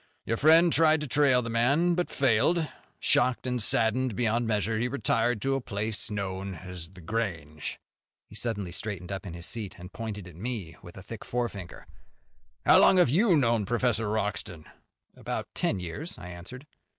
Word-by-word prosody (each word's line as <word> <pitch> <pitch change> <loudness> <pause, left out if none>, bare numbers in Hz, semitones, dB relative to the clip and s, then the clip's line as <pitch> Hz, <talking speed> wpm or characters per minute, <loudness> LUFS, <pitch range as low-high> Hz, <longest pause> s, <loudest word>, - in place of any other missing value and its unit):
Your 115 - 0
friend 165 +4 +6
tried 155 0 +4
to 150 - -3
trail 135 -3 +3
the 115 - -4
man, 140 +10 +3
but 175 0 -1
failed. 140 +6 +2 0.3
Shocked 125 0 +2
and 125 -1 -1
saddened 115 +2 +2
beyond 115 +1 +1
measure, 110 0 0
he 120 - +1
retired 115 -3 0
to 135 - +1
a 135 - 0
place 110 -1 -2
known 95 -2 -4
as 90 -1 -9
The 95 -1 -14
Grange." 85 -7 -3 0.5
He - - -16
suddenly 105 -7 -1
straightened 100 -1 -4
up 95 0 -5
in 85 - -7
his 85 0 -7
seat, 110 -1 -4
and 90 +1 -11
pointed 105 -4 -6
at 90 - -12
me 100 -5 -4
a 90 +2 -11
thick 110 +2 -8
forefinger. 110 -7 -4 0.8
"How - - +7
long 190 - +6
have 180 -7 +5
you 180 - +4
known 115 -5 +2
Professor 115 0 0
Wroxton?" 105 -6 -3 0.5
"About - - -4
ten - - 0
years," 90 - -5
I 90 - -9
answered. 90 - -9
110 Hz, 175 wpm, -28 LUFS, 95-125 Hz, 0.8 s, How